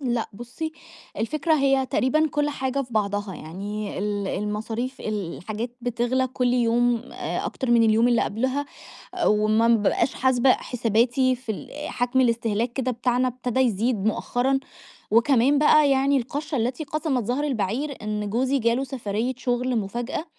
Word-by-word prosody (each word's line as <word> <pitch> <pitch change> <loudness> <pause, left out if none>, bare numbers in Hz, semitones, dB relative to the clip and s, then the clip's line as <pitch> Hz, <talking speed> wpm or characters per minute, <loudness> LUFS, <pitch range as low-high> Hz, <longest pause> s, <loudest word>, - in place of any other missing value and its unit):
لأ 240 -4 -1
بُصّي، 245 +9 -6 0.4
الفكرة 305 +7 0
هي 270 -2 +2
تقريبًا 305 +5 +2
كُلّ 295 +1 0
حاجة 270 -1 -2
في 245 -2 -12
بعضها، 205 -2 -1
يعني 200 +5 -6
ال 205 -1 -2
المصاريف، 220 +5 -3
الحاجات 215 +4 -4
بتغلى 245 +2 0
كُلّ 250 -1 0
يوم 240 0 +2
آآ، - - -3
أكتر 260 -3 -3
من 235 -1 +5
اليوم 225 +2 +4
اللي 240 -1 +3
قبلها، 260 +6 -1 0.6
وما 215 +2 +3
بابقاش 230 +3 +2
حاسبة 260 0 +3
حساباتي 245 +2 +1
في 245 -3 -5
ال 295 +7 -7
حَجم 245 +2 +1
الاستهلاك 230 -1 +1
كده 255 0 -1
بتاعنا 245 +1 +1
ابتدى 250 0 -2
يزيد 225 -2 +1
مؤخرًا، 245 +4 +1 0.5
وكمان 255 +4 +4
بقى 300 -1 +5
يعني 275 +1 +3
القشّة 285 +4 -3
التي 250 +7 -1
قسَمت 290 -4 -1
ظهر 250 +7 -1
البعير 260 +2 -2
إن 210 -1 -3
جوزي 260 +5 +1
جاله 235 +2 +1
سفَرية 245 -1 -3
شُغل 250 -1 0
مفاجأة، 235 +9 -3
245 Hz, 145 wpm, -24 LUFS, 220-265 Hz, 0.6 s, من